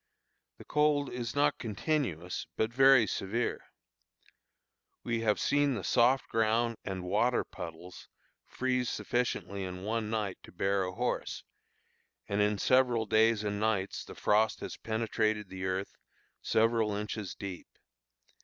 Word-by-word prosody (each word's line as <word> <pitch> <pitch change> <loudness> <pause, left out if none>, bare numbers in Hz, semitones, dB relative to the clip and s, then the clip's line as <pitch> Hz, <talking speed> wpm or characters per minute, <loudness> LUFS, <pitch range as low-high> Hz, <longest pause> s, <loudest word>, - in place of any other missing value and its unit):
The - - -13
cold 150 -2 +2
is 120 -1 -4
not 145 0 +2
continuous, 105 - -2
but 110 +1 0
very 135 -2 +7
severe. 105 +4 -2 1.4
We 115 -1 -1
have 105 -2 +2
seen 145 -2 +2
the 100 - -4
soft 125 +2 +3
ground 115 +1 +1
and 95 -2 -4
water 110 +7 +2
puddles 85 +2 -9 0.4
freeze 125 -1 -1
sufficiently 110 -5 -2
in 90 0 -6
one 110 +1 -1
night 105 -4 -2
to - - -14
bear 95 +2 0
a 90 - -4
horse; 120 +6 -2 0.8
and 100 +1 0
in 105 0 +2
several 125 0 +3
days 110 0 +3
and 105 -1 -2
nights 105 -3 0
the - - -11
frost 110 +1 +2
has - - -5
penetrated 110 -2 -1
the 95 0 -5
earth 95 +1 -2 0.5
several 110 -2 +2
inches 105 -2 -4
deep. 95 -3 -7
110 Hz, 135 wpm, -31 LUFS, 100-120 Hz, 1.4 s, very